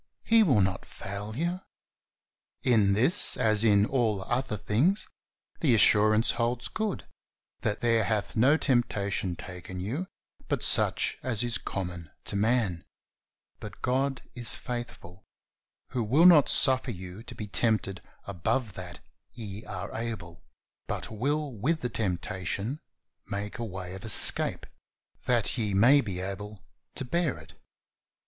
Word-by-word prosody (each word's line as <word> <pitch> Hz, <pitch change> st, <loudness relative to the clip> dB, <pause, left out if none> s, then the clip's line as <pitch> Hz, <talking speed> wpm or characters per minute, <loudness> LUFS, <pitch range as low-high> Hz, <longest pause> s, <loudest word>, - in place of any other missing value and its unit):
He 225 Hz, 0 st, +4 dB
will 135 Hz, -, +3 dB
not 95 Hz, 0 st, -1 dB
fail 100 Hz, +2 st, -7 dB
you. 175 Hz, +4 st, -2 dB, 1.0 s
In 110 Hz, -6 st, +3 dB
this, 130 Hz, -, +7 dB
as 110 Hz, -3 st, +2 dB
in 105 Hz, -2 st, +4 dB
all 110 Hz, -6 st, 0 dB
other 120 Hz, +1 st, -2 dB
things, 145 Hz, -, +1 dB, 0.5 s
the 135 Hz, -9 st, +3 dB
assurance 110 Hz, +1 st, +5 dB
holds 120 Hz, +1 st, -2 dB
good, 215 Hz, -3 st, -4 dB, 0.5 s
that 105 Hz, 0 st, -2 dB
"there 115 Hz, -2 st, +2 dB
hath 105 Hz, 0 st, -2 dB
no 130 Hz, +7 st, +4 dB
temptation 100 Hz, -, -1 dB
taken 90 Hz, +1 st, -9 dB
you 130 Hz, -, -4 dB, 0.4 s
but -, -, -2 dB
such -, -, +3 dB
as 120 Hz, -4 st, -1 dB
is 120 Hz, -1 st, -1 dB
common 90 Hz, -4 st, -6 dB, 0.2 s
to -, -, -1 dB
man; 105 Hz, -5 st, 0 dB, 0.8 s
but 105 Hz, -3 st, -11 dB
God 135 Hz, +1 st, -1 dB
is 120 Hz, -2 st, 0 dB
faithful, 120 Hz, -7 st, -7 dB, 0.7 s
who 125 Hz, -, -1 dB
will 140 Hz, +11 st, +3 dB
not 165 Hz, -6 st, +7 dB
suffer 130 Hz, 0 st, +4 dB
you 95 Hz, -1 st, -8 dB
to 120 Hz, +1 st, -11 dB
be 105 Hz, -, -6 dB
tempted 105 Hz, -3 st, -1 dB, 0.2 s
above 100 Hz, +4 st, -2 dB
that 90 Hz, -1 st, -9 dB, 0.3 s
ye 105 Hz, -2 st, -8 dB
are -, -, -7 dB
able, 110 Hz, -8 st, -6 dB, 0.5 s
but -, -, -4 dB
will 145 Hz, +6 st, -2 dB
with 145 Hz, +10 st, -1 dB
the 125 Hz, -, -2 dB
temptation 100 Hz, -, -3 dB, 0.5 s
make 105 Hz, +4 st, -5 dB
a -, -, -3 dB
way 95 Hz, -4 st, -7 dB
of 95 Hz, -, -9 dB
escape 110 Hz, -, +4 dB, 0.6 s
that 120 Hz, 0 st, 0 dB
ye 105 Hz, -3 st, -1 dB
may 130 Hz, +8 st, +5 dB
be 100 Hz, -6 st, -5 dB
able 100 Hz, +2 st, -6 dB, 0.4 s
to 135 Hz, -, -2 dB
bear 170 Hz, +2 st, -1 dB
it." -, -, -15 dB
110 Hz, 140 wpm, -27 LUFS, 100-130 Hz, 1.0 s, this